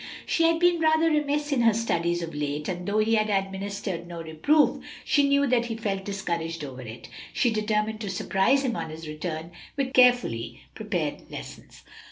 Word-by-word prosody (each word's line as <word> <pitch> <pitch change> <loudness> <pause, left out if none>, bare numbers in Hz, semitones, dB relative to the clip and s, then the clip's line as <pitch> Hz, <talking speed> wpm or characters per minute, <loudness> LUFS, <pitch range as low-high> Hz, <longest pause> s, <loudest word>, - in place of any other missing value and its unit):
She 330 - +2
had 330 0 +4
been 350 0 +3
rather 320 0 +3
remiss 295 0 0
in 270 -4 +2
her 230 -2 +4
studies 175 -6 0
of 165 - -6
late, 150 0 -3
and 180 -1 -4
though 205 +1 0
he 215 +1 +2
had 215 -1 +2
administered 195 -2 -2
no 170 -1 -7
reproof, 165 - +2 0.2
she 285 -1 +3
knew 280 0 +4
that 245 -3 +2
he 230 -1 -4
felt 195 -4 -3
discouraged 170 -5 -3
over 130 -2 -7
it. 115 -1 -9 0.3
She 240 - +2
determined 215 0 -1
to 205 - -4
surprise 205 +7 +2
him 240 -3 0
on 165 -5 -4
his 160 +1 -8
return 160 +1 -5 0.3
with 270 -1 -1
carefully 245 - +3
prepared - - -3
lessons. - - -10
210 Hz, 185 wpm, -26 LUFS, 170-255 Hz, 0.3 s, had